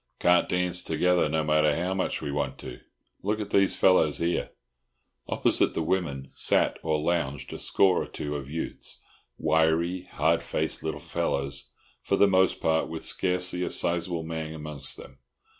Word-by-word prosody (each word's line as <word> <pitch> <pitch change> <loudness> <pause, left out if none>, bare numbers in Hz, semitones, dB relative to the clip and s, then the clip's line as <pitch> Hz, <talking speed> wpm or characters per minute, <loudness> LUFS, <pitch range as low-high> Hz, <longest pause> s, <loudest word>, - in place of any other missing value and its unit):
"Can't 90 0 +3
dance 90 0 +1
together, 90 -3 +1
no 80 +1 0
matter 75 -1 +3
how 90 +3 -1
much 95 -4 -2
we 70 - -3
want 70 0 -2
to. 60 -1 -9 0.4
Look 105 +2 -1
at 105 -1 -5
these 100 -1 +3
fellows 85 -6 +4
here." 85 +1 -1 0.8
Opposite - - +1
the 80 - 0
women 75 -7 -2
sat - - +1
or 80 -1 0
lounged 75 -4 -2
a - - -6
score 95 -2 +3
or - - -5
two 75 0 -5
of 70 -2 -6
youths—wiry, 80 +2 -1
hard 80 +2 +2
faced - - -2
little - - -3
fellows, 70 0 -2 0.3
for - - 0
the 100 - +5
most 95 -1 +3
part, 80 0 +1
with 80 -1 -4
scarcely 90 -1 +1
a - - -2
sizeable 85 -1 0
man 80 -1 -5
amongst 75 -3 -4
them. 65 - -13
80 Hz, 160 wpm, -27 LUFS, 75-90 Hz, 0.8 s, the